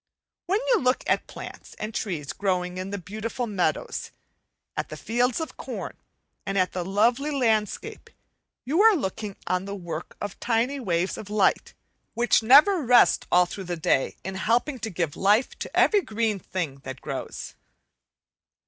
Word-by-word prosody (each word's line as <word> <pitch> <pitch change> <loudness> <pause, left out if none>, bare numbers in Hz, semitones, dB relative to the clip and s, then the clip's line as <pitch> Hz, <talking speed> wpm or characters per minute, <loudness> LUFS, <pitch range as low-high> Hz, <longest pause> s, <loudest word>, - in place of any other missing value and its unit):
When 390 +4 +2
you 480 -4 +5
look 255 -4 +1
at - - +1
plants - - -10
and 215 +1 -5
trees 160 -11 -3
growing 180 -2 -1
in 185 +1 -4
the 200 - -3
beautiful 215 +6 -4
meadows; 200 -5 -1 0.7
at - - -3
the - - -7
fields 245 +3 0
of 320 - -5
corn, - - -6 0.5
and 195 0 -2
at 185 -1 +2
the 180 - -3
lovely 230 +10 +2
landscape, 225 -7 -1 0.6
you 310 +9 +2
are 445 -1 +7
looking 210 - -3
on 185 +1 -1
the 200 0 -5
work 170 -3 -7
of 205 - -3
the - - -17
tiny 245 +4 +1
waves 180 -5 -1
of 205 - -9
light, 210 -2 +1 0.4
which 240 0 +3
never 295 - +7
rest 245 -1 +5
all 180 0 +6
through 190 +2 -7
the 175 -1 -3
day 160 -5 +1
in 190 - -4
helping 235 +8 0
to 220 - -3
give 170 -5 -2
life 210 +6 +3
to - - -5
every 415 -2 +5
green 220 - -1
thing 160 -7 -4
that 135 -1 -8
grows. - - -6
210 Hz, 165 wpm, -26 LUFS, 185-245 Hz, 0.7 s, are